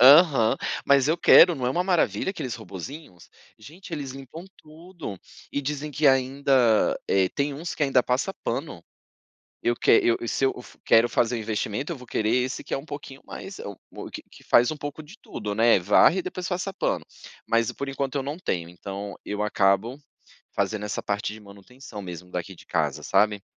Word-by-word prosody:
Aham, 135 -3 +7 0.3
mas 140 0 +4
eu 165 +2 +2
quero, 170 -1 +7
não 125 - -2
é - - +1
uma 175 +7 +1
maravilha 175 - +1
aqueles 130 - -5
robozinhos, 110 - -9 0.3
gente, 160 - -13
eles 140 -4 -4
limpam 135 +5 -10
tudo 155 - -10 0.3
e 140 - -1
dizem 145 +1 -4
que 150 +1 +1
ainda, 130 -3 +3
eh, 95 -1 +3
tem 145 0 -1
uns 160 +5 -5
que - - -3
ainda 135 -3 +4
passa 130 +11 0
pano. 120 - -3 0.8
Eu 120 - +1
que - - +2
eu 115 - +2
se 135 - +1
eu 135 - +2 0.3
quero 115 +1 +5
fazer 120 +1 +1
um - - -3
investimento, 110 - -3
eu 165 - -4
vou 125 -1 -13
querer 110 0 0
esse 125 +1 0
que - - -6
é - - +1
um 135 - -9
pouquinho 140 -3 -8
mais, 195 0 -8
é - - -7
o 100 -2 -10
que - - -7
que - - -15
faz 120 +3 +5
um 155 - -5
pouco 145 +2 -6
de 150 - -14
tudo, 105 -2 -5
né, 115 +2 +5
varre 105 - +5
e - - 0
depois 185 0 -5
passa 185 +1 -2
pano, 195 - -1 0.4
mas 115 -1 +2
por 140 - -5
enquanto 135 0 -3
eu 140 - 0
não 145 +4 -4
tenho, 85 - -3
então, 100 +3 -7
eu 105 0 -2
acabo 105 +5 +1 0.6
fazendo 105 -1 -1
essa 105 - -4
parte 105 0 -2
de 110 - -10
manutenção 105 +3 -11
mesmo 90 -1 -9
daqui 90 +1 -5
de - - -16
casa, - - -1
sabe 105 -1 +2
130 Hz, 195 wpm, -25 LUFS, 105-150 Hz, 0.8 s, Aham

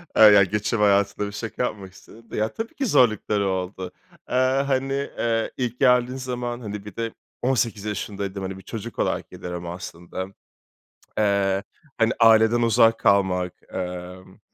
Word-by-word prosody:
Ah, 110 -1 +9
ya, 100 -1 +7
göçebe 105 +3 -1
hayatında 100 0 +2
bir 100 - -6
şaka 110 +3 -4
yapmak 100 -6 -4
istedim 110 +4 -17
de, - - -4
ya 110 +1 0
tabii 225 +1 -5
ki 275 - -1
zorlukları 110 - +3
oldu. 95 0 -3 0.4
Aaa, 130 +2 +2
hani, 135 +1 0
eee, 120 -5 -1
ilk 125 -1 -3
geldiğim 125 +1 +3
zaman 125 -1 -4
hani 105 -2 -6
bir 105 - -10
de 115 -1 -3 0.3
18 120 -5 0
yaşındaydım, 100 -1 -4
hani 95 0 -5
bir 95 - -12
çocuk 115 +3 -7
olarak - - -1
geliriyorum 90 -1 -6
aslında. 85 +1 -6 0.9
Eee, 100 -2 +2 0.3
hani 115 +1 +3
aileden 115 +1 +6
uzak 115 0 +4
kalmak, 90 -2 +2 0.2
emm, 90 +1 -6
105 Hz, 155 wpm, -24 LUFS, 95-120 Hz, 0.9 s, Ah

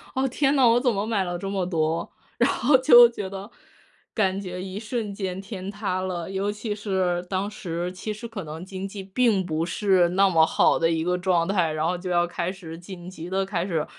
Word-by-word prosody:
“哦， 265 +1 +1
天 275 +2 +1
哪， 265 -3 +5
我 235 +1 +5
怎 245 -1 +2
么 200 0 -1
买 220 -3 0
了 175 -1 -3
这 195 +2 -5
么 195 -2 -1
多。” 165 -2 -1 0.3
然 - - +4
后 265 +2 +4
就 240 -2 +8
觉 205 -5 -5
得 195 +3 -8 0.6
感 195 -2 +1
觉 180 -2 -6
一 190 +1 -6
瞬 215 -1 -4
间 190 -2 -4
天 195 -1 -7
塌 200 -2 -2
了， 180 -1 -4
尤 195 +1 -1
其 210 +1 -4
是 190 -4 -1
当 195 +2 -2
时， 175 -2 -4
其 190 +4 -5
实 215 +3 -9
可 220 -4 -6
能 155 +2 -7
经 190 0 -6
济 195 0 -8
并 195 0 +1
不 160 -1 -1
是 185 -1 +2
那 195 +2 +3
么 165 -3 +5
好 - - +3
的 165 - +2
一 165 -1 0
个 180 +1 0
状 175 -2 +1
态， 180 -5 +1
然 155 0 -1
后 180 +2 0
就 180 +1 -6
要 175 -1 +3
开 175 0 -3
始， 170 -4 -9
紧 180 -1 -9
急 175 -2 -8
地 190 +1 0
开 185 -3 -2
始 160 -5 -1
190 Hz, 245 characters per minute, -25 LUFS, 175-205 Hz, 0.6 s, 就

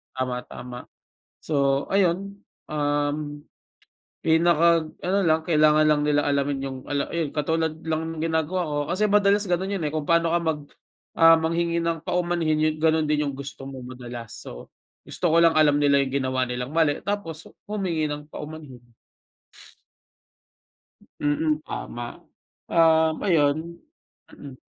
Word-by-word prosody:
tama, 125 -1 -3
tama. 125 0 -8 0.6
So, 140 -2 0
ayun, 195 +1 +1 0.3
um, 145 0 -1 0.8
pinaka-ano 170 +2 +2
lang, 160 0 +3
kailangan 155 -2 +4
lang 150 -1 +3
nila 145 0 +2
alamin 140 -1 0
yung 135 -1 -5
ala 140 -1 -2
yun 165 -4 -2
katulad 160 +1 0
lang 160 0 -2
ng 155 - -5
ginagawa 165 +2 0
ko. 145 - -1 0.2
Kasi 210 +2 +1
madalas 200 -1 +3
gano'n 190 +3 0
yun, - - -4
eh, 150 - -1
kung 155 -1 -3
paano 170 0 +3
ka 170 - +3
mag 160 -3 -1 0.6
ah, 165 0 +8
manghingi 170 +1 0
ng 165 -1 -2
paumanhin, 170 -3 0
yun - - -4
gano'n 160 0 +2
din 150 -1 +1
yung 140 - -4
gusto 135 0 -8
mo 135 -1 -8
madalas. 120 -2 -8
So, - - -10 0.3
gusto 180 - -3
ko 165 - +4
lang 165 -1 +4
alam 145 -1 +4
nila 140 -1 +4
yung 130 - -6
ginawa 130 0 0
nilang 125 +2 -4
mali, 160 -2 +1
tapos 175 -6 -4 0.2
humingi 185 -7 -1
ng 150 0 -6
paumanhin. 140 -6 -10 2.3
Mm, 150 +1 +1
tama. 120 0 -7 0.5
Um, 160 -1 +4
ayun 160 0 +1 0.5
mm. 135 -3 -12
155 Hz, 140 wpm, -24 LUFS, 145-170 Hz, 2.3 s, ah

